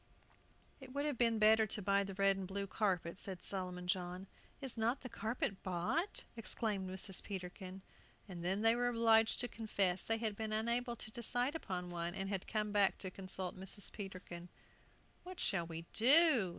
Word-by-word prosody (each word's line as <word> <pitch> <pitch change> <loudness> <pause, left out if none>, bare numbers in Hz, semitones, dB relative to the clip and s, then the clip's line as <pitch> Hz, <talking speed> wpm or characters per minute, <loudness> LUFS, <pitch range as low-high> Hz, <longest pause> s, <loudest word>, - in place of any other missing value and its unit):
"It 265 -2 -10
would 285 +1 0
have 290 -5 -1
been 230 -2 +4
better 220 +1 +6
to 210 - -1
buy 200 0 +2
the 195 -1 -6
red 195 0 +4
and 190 -1 -4
blue 200 +1 -3
carpet," 185 -3 -1
said 190 -3 -5
Solomon 180 -2 -4
John. 180 0 -2 0.3
"Is 270 -4 -4
not 230 +3 +1
the 255 - -6
carpet 220 -3 -2
bought?" 185 - -1
exclaimed 210 -4 -2
Mrs. 190 0 0
Peterkin. 185 0 -7 0.4
And 175 -3 -7
then 190 +4 0
they 225 +1 +5
were 245 0 +1
obliged 225 -2 +4
to 245 - 0
confess 195 -6 0
they 225 - 0
had 220 -2 -1
been 220 0 -3
unable 235 +2 +1
to 215 - -7
decide 245 +4 0
upon 180 - -4
one, 170 0 -3
and 195 0 -3
had 195 -2 -3
come 210 -1 -1
back 200 -2 +4
to 185 - -5
consult 185 -1 -3
Mrs. 190 +2 -1
Peterkin. 185 -3 -7 0.7
"What 365 0 -9
shall 170 -4 0
we 165 0 -6
do?" 260 - +6
200 Hz, 180 wpm, -37 LUFS, 185-230 Hz, 0.7 s, better